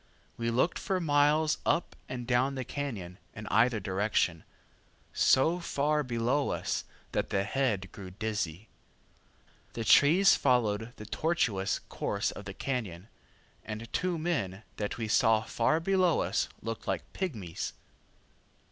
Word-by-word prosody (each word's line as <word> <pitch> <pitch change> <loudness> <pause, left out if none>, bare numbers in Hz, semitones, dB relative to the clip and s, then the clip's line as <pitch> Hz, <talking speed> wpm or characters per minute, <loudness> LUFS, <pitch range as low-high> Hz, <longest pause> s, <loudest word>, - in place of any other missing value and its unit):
We 115 0 -2
looked 125 +9 +1
for 190 -3 -1
miles 150 0 +3
up 170 - 0
and 125 -1 -5
down 130 +3 +2
the 130 -2 -4
cañon, 110 -11 -5 0.2
in 110 - -7
either 115 +2 +4
direction, 95 -4 0 0.7
so 160 +7 +4
far 150 -2 0
below 125 +2 0
us - - -2 0.3
that - - -1
the 95 - +1
head 105 -4 -1
grew 95 -2 -9
dizzy. 105 -2 -3 1.1
The 115 - -3
trees 170 - +6
followed 115 -3 +1
the 105 - -9
tortuous 115 - 0
course - - -2
of - - -9
the - - -6
cañon, 110 -8 -4 0.5
and 110 +2 -7
two 180 -2 0
men 115 - -2
that 105 -1 -3
we 115 -2 -3
saw 110 0 +4
far 150 +7 +1
below 185 -1 +2
us - - 0
looked 115 +1 -5
like - - -1
pigmies. 110 - -4
120 Hz, 135 wpm, -30 LUFS, 105-145 Hz, 1.1 s, trees